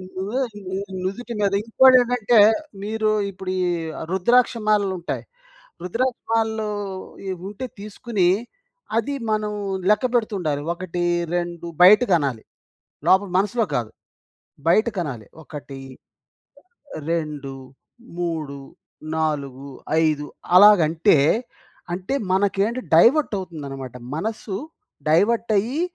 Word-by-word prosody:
నువ్వే 200 +8 -2 0.3
ని 190 - -3 0.3
నుదిటి 235 +6 -4
మీద 200 -1 +2
ఇంకోటేంటంటే 245 -1 +4 0.4
మీరు 215 +1 -1 0.2
ఇప్పుడు 185 0 -6
ఈ - - +1 0.5
రుద్రాక్ష 235 +8 +3
మాలలు 205 -2 +2
ఉంటాయి. 170 - -4 0.6
రుద్రాక్ష 240 +7 -1
మాలలు 220 -1 0 0.6
ఈ - - -2 0.2
ఉంటే 210 +6 -6
తీసుకొని 210 -2 -1 0.7
అది 230 +5 0 0.2
మనం 210 -1 0 0.4
లెక్కపెడుతుండాలి. 210 - +1
1, 175 0 -4 0.3
2 175 -1 -3
బయటికనాలి. 175 - +5 0.6
లోపల 190 +1 +4
మనసులో 220 +4 +1
కాదు. 115 -4 -1 0.8
బయటికనాలి. 170 - 0 0.2
1, 140 -3 -9 1.3
2, 150 -5 -3 0.6
3, 160 -5 -3 0.6
4, 140 -3 -2 0.3
5 150 -2 0 0.3
అలాగంటే 170 -6 +6 0.8
అంటే 185 +8 -3 0.2
మనకేంటి 200 +5 +1
డైవర్ట్ 245 - +5
అవుతుందన్నమాట. 140 -8 -7 0.2
మనస్సు 215 +4 -4 0.5
డైవర్ట్ 220 +9 +2
అయ్యి 245 +10 -1
190 Hz, 90 wpm, -22 LUFS, 160-220 Hz, 1.3 s, అలాగంటే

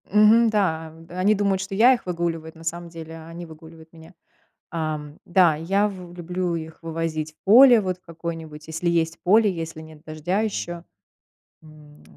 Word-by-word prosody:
Мгм, 215 +3 +5
да, 165 -7 0 0.2
они 185 +4 +2
думают, 195 -2 0
что 195 +1 -5
я 240 +6 +6
их 245 - -4
выгуливаю, 170 -2 -3
эт 160 - -16
на 165 - -13
самом 170 +1 -4
деле 165 -1 -9
они 165 +2 -9
выгуливают 160 0 -14
меня. 165 +2 -15 0.6
Эм. 155 -3 -4
Да, 175 -3 +4
я 195 +7 +1
в 180 -4 -9
люблю 175 0 -3
их 160 -1 -7
вывозить 160 -1 -3
в - - -49
поле, 240 +4 +8
вот 185 -2 -2
в - - -46
какое-нибудь, 165 -2 -7
если 160 +2 -2
есть 165 -1 0
поле, 210 +3 +4
если 165 -2 -6
нет 155 -1 -14
дождя 160 +5 -2
ещё. 175 -5 -3 0.8
М, 150 -1 -17
170 Hz, 175 wpm, -23 LUFS, 160-190 Hz, 0.8 s, поле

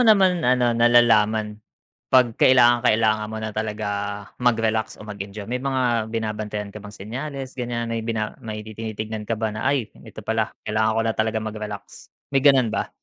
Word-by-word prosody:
naman, 195 -7 +5
ano, 125 -1 +3
nalalaman 110 -3 +3 0.5
pag 125 -3 +4
kailangang-kailangan 120 -4 +4
mo 110 - -6
na 110 -1 -4
talaga 110 0 -3 0.5
magrelax 110 -2 +1
o - - -11
mag-enjoy? 100 0 -7
May 125 +4 -3
mga 125 -4 0
binabantayan 105 -2 -4
ka 105 - -9
bang 105 0 -11
senyales 130 +5 -6
ganyan 120 -2 -3
may 115 - -1
bina 110 -1 -2
may 105 -2 -6
tinitignan 110 0 -6
ka 115 - 0
ba 110 -1 -2
na, 110 - -5
"Ay, 130 -6 0
ito 110 - -12
pala, 110 0 -1
kailangan 110 +1 +1
ko - - +3
na 115 - +1
talaga 110 0 0
magrelax," 110 -1 -7 0.2
may 135 - +3
ganun 135 -5 +4
ba? - - -1
110 Hz, 165 wpm, -23 LUFS, 110-120 Hz, 0.5 s, naman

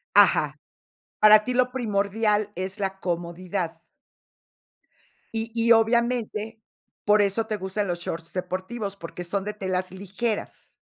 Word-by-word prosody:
Ajá. - - +5 0.6
Para 215 0 +8
ti 250 - -1
lo 250 0 +2
primordial 210 -2 0
es 190 +2 -4
la 195 -1 -3
comodidad. 175 0 -3 1.6
Y 225 0 -2
y, 230 0 +3
obviamente, 225 -1 +2 0.4
por 210 0 +5
eso 205 +3 +1
te 215 - -1
gustan 190 +2 -2
los 175 -1 -2
shorts 165 -1 -5
deportivos, 190 +3 -4
porque 175 0 -7
son 190 +3 -2
de 210 - -3
telas 185 -3 -2
ligeras. 200 +4 -4
205 Hz, 125 wpm, -25 LUFS, 185-225 Hz, 1.6 s, Para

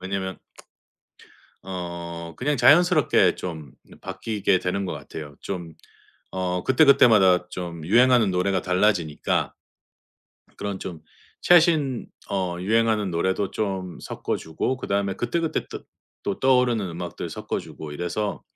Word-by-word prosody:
왜냐면 95 0 -4 1.3
어 85 -2 -6
그냥 145 +2 0
자연스럽게 175 +2 +5
좀 80 -7 -7 0.3
바뀌게 100 -4 -1
되는 95 +2 -2
것 90 - -3
같아요. 75 0 -9
좀 85 -4 -6 0.6
어 90 -1 -2
그때그때마다 110 - +5
좀 85 -3 -6
유행하는 120 0 +4
노래가 90 +2 0
달라지니까 90 -4 0 1.0
그런 100 -2 -4
좀 85 -4 -7 0.4
최신 160 -7 +4 0.2
어 90 -3 -2
유행하는 110 -1 +1
노래도 95 +3 0
좀 95 -4 -3
섞어 - - -3
주고 80 +11 -3
그다음에 100 -4 -1
그때그때 160 +10 -1
떠 - - -8 0.4
또 100 - -2
떠오르는 125 -6 +2
음악들 85 0 -6
섞어 - - -4
주고 75 -2 -9
이래서 90 +7 -3
95 Hz, 270 characters per minute, -24 LUFS, 90-115 Hz, 1.3 s, 자연스럽게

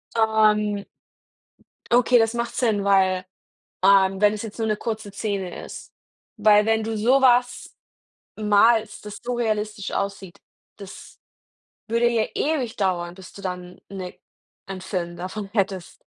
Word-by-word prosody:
Ähm 215 -2 +2 1.1
Okay, 245 +1 +5
das 225 0 +2
macht 235 0 -3
Sinn, 220 -5 +1
weil, 190 -2 +2 0.6
ähm, 195 0 +4
wenn 210 0 +5
es 210 - -5
jetzt 220 -3 -8
nur 225 -1 -1
'ne 215 - 0
kurze 220 -2 -5
Szene 200 -3 -4
ist. - - -10 0.5
Weil 210 -1 +5
wenn 225 0 +1
du 220 0 -3
sowas 245 +1 +2 0.6
malst, 215 +1 +2
das 205 -1 -7
so 245 +1 -3
realistisch 215 -3 -2
aussieht, 195 -2 -4 0.4
das 200 -2 -12 0.7
würde 235 +2 +2
ja 230 -2 +1
ewig 275 -7 -1
dauern, 175 -3 -1
bis 185 0 -13
du 200 - -12
dann 180 -1 -6
'ne 185 -2 -7 0.5
einen 190 -1 -7
Film 180 -2 -4
davon 190 +3 -6
hättest. 190 -4 -2
210 Hz, 135 wpm, -23 LUFS, 195-225 Hz, 1.1 s, Okay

